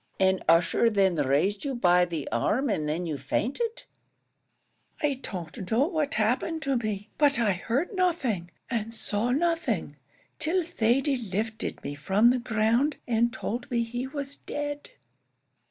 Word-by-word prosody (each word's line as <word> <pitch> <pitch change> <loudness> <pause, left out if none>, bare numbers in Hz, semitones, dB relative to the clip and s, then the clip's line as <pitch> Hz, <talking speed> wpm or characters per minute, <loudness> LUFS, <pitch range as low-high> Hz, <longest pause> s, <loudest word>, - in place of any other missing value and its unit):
"And 190 0 +3
Ussher 170 +7 +4
then 195 -5 +2
raised 150 +9 +1
you 275 -2 -2
by 180 -5 +4
the 165 -5 -4
arm, 240 - +1
and 155 -7 -1
then 165 +4 -1
you 155 -4 -3
fainted?" 280 - -2 1.2
"I 280 -3 0
don't 180 0 -6
know 240 +5 +3
what 310 -4 -1
happened 255 +9 0
to 275 -2 +1
me; 215 -3 -3
but 285 -2 +4
I 225 -4 +3
heard 240 - -1
nothing, 285 - 0 0.2
and 225 -2 -2
saw 220 +1 -1
nothing, 270 - 0 0.4
till 330 +4 +1
Thady 275 -2 +1
lifted 220 0 -3
me 145 - -4
from 195 +11 +3
the 255 - +1
ground, 235 +5 +1
and 235 0 +2
told 245 0 -4
me 235 -2 +1
he 245 +3 -4
was 280 0 -5
dead." 290 0 -5
230 Hz, 150 wpm, -27 LUFS, 190-280 Hz, 1.2 s, Ussher